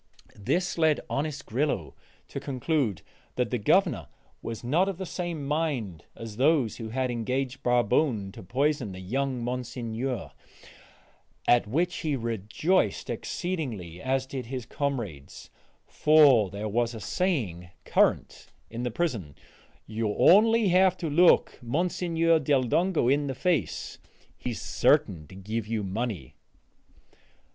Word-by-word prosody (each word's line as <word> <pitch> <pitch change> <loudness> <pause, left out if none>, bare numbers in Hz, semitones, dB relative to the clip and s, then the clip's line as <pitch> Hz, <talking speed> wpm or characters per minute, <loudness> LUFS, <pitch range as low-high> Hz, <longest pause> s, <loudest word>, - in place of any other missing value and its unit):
This 175 - -1
led 155 -2 +3
honest 150 +1 -2
Grillo 140 +6 -1 0.4
to - - -5
conclude 130 - -1 0.3
that - - -1
the - - 0
Governor - - +2 0.3
was 115 -1 -6
not 165 +11 +2
of 195 - -4
the 190 - -4
same 175 -5 -4
mind 140 - -2
as 110 -2 -8
those 135 -4 +2
who 115 -2 -6
had 130 +2 -1
engaged 125 +3 -2
Barbone 120 -3 +1
to - - -11
poison 130 +1 -1
the 95 - -8
young 130 +6 -2
Monsignor; 120 - -4 1.2
at 120 -3 +4
which 175 +10 0
he 155 -4 -1
rejoiced 115 - 0
exceedingly, 115 - -4
as 130 0 0
did 130 -3 -6
his 125 -1 -5
comrades, 115 - -4 0.3
for 145 -9 +5
there 100 +3 -5
was 115 +2 0
a - - -6
saying 105 - -2 0.2
current - - +1 0.2
in 115 +1 -5
the 125 - -1
prison 110 - -2 0.5
"You 110 +1 -2
have 105 - -3
only 220 +1 +6
to 185 -2 +3
look 175 +4 +4
Monsignor 165 +4 +1
del 140 -4 +2
Dongo 165 +3 +1
in 140 +2 +2
the 135 - -3
face; 160 - -1 0.4
he - - -5
is - - -5
certain 75 -4 +2
to 95 - -13
give 105 +3 -4
you 110 -2 -2
money." 95 - -4
130 Hz, 135 wpm, -27 LUFS, 110-155 Hz, 1.2 s, only